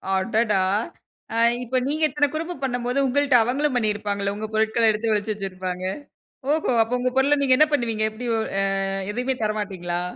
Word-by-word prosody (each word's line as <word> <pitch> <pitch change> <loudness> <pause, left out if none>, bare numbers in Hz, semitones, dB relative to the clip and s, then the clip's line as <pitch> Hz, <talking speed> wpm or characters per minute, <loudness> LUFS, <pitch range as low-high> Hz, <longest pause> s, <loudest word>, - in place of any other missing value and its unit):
அடடா! 210 0 +1 0.7
ஆ, - - 0 0.3
இப்ப 255 +2 -1
நீங்க 310 +3 -1
இத்தன 290 +2 +1
குறும்பு 330 +3 -3
பண்ணம்போது, 245 +1 -1
உங்கள்ட 280 0 +2
அவங்களும் 265 +4 0
பண்ணியிருப்பாங்கல்ல! 205 -3 -1
உங்க 215 +1 -4
பொருட்கள 220 +1 +3
எடுத்து 220 +1 -1
ஒழிச்சி 210 +1 -1
வெச்சிருப்பாங்க. 185 -2 -5 0.7
ஓஹோ! 310 -4 +1
அப்ப 240 +3 -1
உங்க 255 0 0
பொருள 285 +2 +3
நீங்க 260 -2 +4
என்ன 305 - +5
பண்ணுவீங்க? 225 -5 0
எப்டி 240 +3 -6 0.3
ஆ, - - +2 0.5
எதையுமே 250 +4 -1
தர 215 0 +1
மாட்டீங்களா? 175 -3 -3
230 Hz, 160 wpm, -23 LUFS, 210-265 Hz, 0.7 s, என்ன